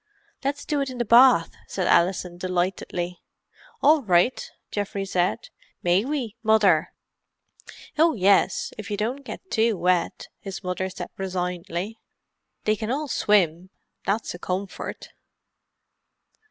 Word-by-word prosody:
"Let's 280 +1 -2
do 295 -2 0
it 275 - -2
in 255 - -7
the 240 - -1
bath," 235 -7 +6 0.2
said 185 - -2
Alison, 175 0 +2
delightedly. 180 -1 -2 0.6
"All 300 +1 +6
right," 185 +2 +2 0.2
Geoffrey 200 -1 -3
said. 180 -2 -1 0.3
"May 180 +3 +3
we, 260 -7 -3
Mother?" 210 -8 +4 1.1
"Oh, 320 -1 +5
yes, 195 -1 +2
if 210 - -7
you 205 - -2
don't 245 +7 -2
get 375 +7 -9
too 225 -2 +2
wet," 180 0 0
his 195 0 -7
mother 180 +1 -2
said - - -7
resignedly. 180 +2 -3 0.6
"They 215 - +2
can 215 +1 -5
all 290 +4 -1
swim, 185 -6 +2 0.3
that's 210 +3 -1
a 175 - -9
comfort. 185 +2 -5
195 Hz, 125 wpm, -25 LUFS, 180-235 Hz, 1.1 s, bath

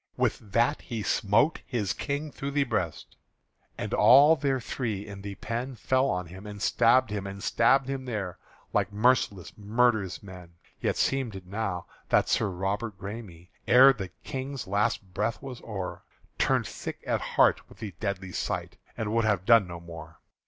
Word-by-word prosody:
With - - +1
that 120 +6 +2
he 115 -5 -5
smote 115 +13 +2
his 105 -7 -2
King 145 +1 -3
through 140 - -5
the 140 0 +2
breast; 100 - -3 0.6
And - - -4
all 145 +5 +7
they 135 -2 0
three 110 -5 -3
in 100 -2 -9
the 100 0 -6
pen 120 +6 -4
Fell 130 +4 +1
on 90 0 -1
him 95 +5 -10
and 105 0 -8
stabbed 120 +3 +3
and 100 -1 -5
stabbed 135 +3 +3
him 135 -1 -4
there 105 -8 -4 0.3
Like 100 -1 +1
merciless 105 -4 +1
murderous 110 -2 +1
men 90 -3 -12 0.2
Yet - - -1
seemed 130 -6 0
it 95 -1 -9
now 95 -2 -3 0.2
that - - +3
Sir 105 - +2
Robert 95 +3 -3
Græme, 100 -4 -8 0.2
Ere 130 +2 +8
the 95 -7 -6
King's 135 0 -5
last 100 -1 -1
breath 110 +3 -1
was 130 -3 -8
o'er, 95 -5 -5 0.4
Turned - - +2
sick - - -7
at - - 0
heart - - +2
with - - -16
the 105 -4 -6
deadly 95 -3 -3
sight - - -3 0.2
And 110 -1 -2
would 115 -1 +2
have 100 -4 +1
done 115 -4 +6
no 85 -1 -7
more. 80 -2 -11
105 Hz, 170 wpm, -28 LUFS, 95-125 Hz, 0.6 s, Ere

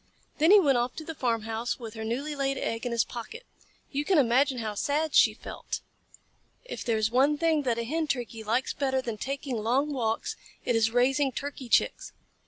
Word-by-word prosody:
Then 315 +3 +5
he 415 +1 +9
went 275 -9 +3
off 240 +1 -2
to 315 - -7
the 320 - -5
farmhouse 230 -3 -2
with 225 -3 -8
her 220 -1 -6
newly 270 +7 -3
laid 275 -1 -1
egg 230 +2 -2
in - - -3
his 235 -1 +2
pocket. 445 - -8 0.5
You 285 +1 -1
can 370 +3 +2
imagine 265 +1 +3
how 220 -3 -3
sad 295 +7 -1
she - - +6
felt. - - -6 0.8
If - - -6
there 230 -2 +1
is 220 0 +1
one 275 +4 +3
thing 320 -1 +2
that 230 - +1
a 235 - -1
Hen 315 +6 -1
Turkey 240 -5 -3
likes 235 +5 0
better 265 -2 0
than 230 -3 -4
taking 270 -1 -3
long 260 +7 +1
walks, 225 -4 -1 0.3
it 245 - +1
is 225 -1 +3
raising 265 +4 +2
Turkey 275 -1 -6
Chicks. - - +1
255 Hz, 200 wpm, -28 LUFS, 230-290 Hz, 0.8 s, he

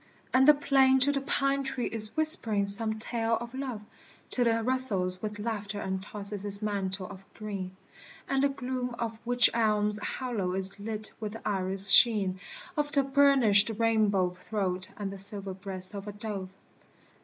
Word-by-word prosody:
And 265 +1 +3
the 300 - +7
plane 270 -2 +2
to 285 +2 +6
the 275 -1 -3
pine 275 0 -1
tree 265 -2 -4
is 215 +1 -2
whispering 235 - 0
some 220 +2 +3
tale 225 0 -2
of 235 +1 -9
love 260 -5 -6 0.5
Till 245 -2 0
it 230 0 0
rustles 210 -8 +1
with 210 -1 -6
laughter 210 -1 -5
and 190 -1 -4
tosses 205 0 -5
its 200 -1 -1
mantle 195 -2 -4
of 195 0 -12
green, 200 -4 -7
m - - -22 0.5
And 270 0 -1
the 280 - +2
gloom 255 -2 -5
of 230 -2 -3
the 225 - -19
wych 245 0 +5
elm's 210 -2 0
hollow 210 -6 -4
is 190 +2 -3
lit 215 +1 -3
with 215 -2 -6
the 225 - -8
iris 195 0 +5
sheen 200 -4 +7 0.4
Of 295 -1 -2
the 280 -2 +2
burnished 265 -7 +4
rainbow 215 -5 +1
throat 185 -3 -3
and 200 -2 -5
the 195 - -8
silver 195 0 0
breast 185 0 -7
of 200 0 -8
a 205 - -7
dove. 205 -3 -7
215 Hz, 180 wpm, -27 LUFS, 195-250 Hz, 0.5 s, the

